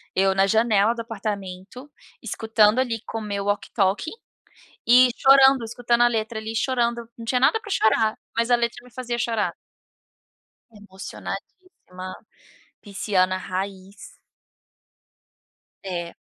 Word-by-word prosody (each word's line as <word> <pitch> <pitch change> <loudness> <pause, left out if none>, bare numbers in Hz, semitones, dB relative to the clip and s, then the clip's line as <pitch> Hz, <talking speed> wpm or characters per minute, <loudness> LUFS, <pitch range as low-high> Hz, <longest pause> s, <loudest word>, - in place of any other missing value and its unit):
eu 190 0 +2
na 195 0 +4
janela 220 +1 +3
do 235 - -5
apartamento, 210 +3 -6 0.3
escutando 220 -1 +2
ali 230 -4 -1
com 225 - -5
o - - -4
meu 200 -1 -3
walkie 205 0 -2
talkie 200 - 0 0.7
e 250 +2 +7
chorando, 270 -2 +6
escutando 235 +1 0
a 240 - +6
letra 220 -1 -2
ali 220 +1 -6
chorando, 235 -1 -1
não 230 - -9
tinha 250 +1 +1
nada 265 - +4
pra 420 - -11
chorar, 220 - +2 0.2
mas 230 +1 +1
a - - +7
letra 235 +1 -3
me 250 - -17
fazia 240 -2 -4
chorar. 230 -3 -1 1.2
Emocionadíssima, 195 - -9 0.7
pisciana 190 -2 0
raiz. 190 +1 -7 1.7
É. 175 -2 -5
225 Hz, 125 wpm, -23 LUFS, 195-240 Hz, 1.7 s, e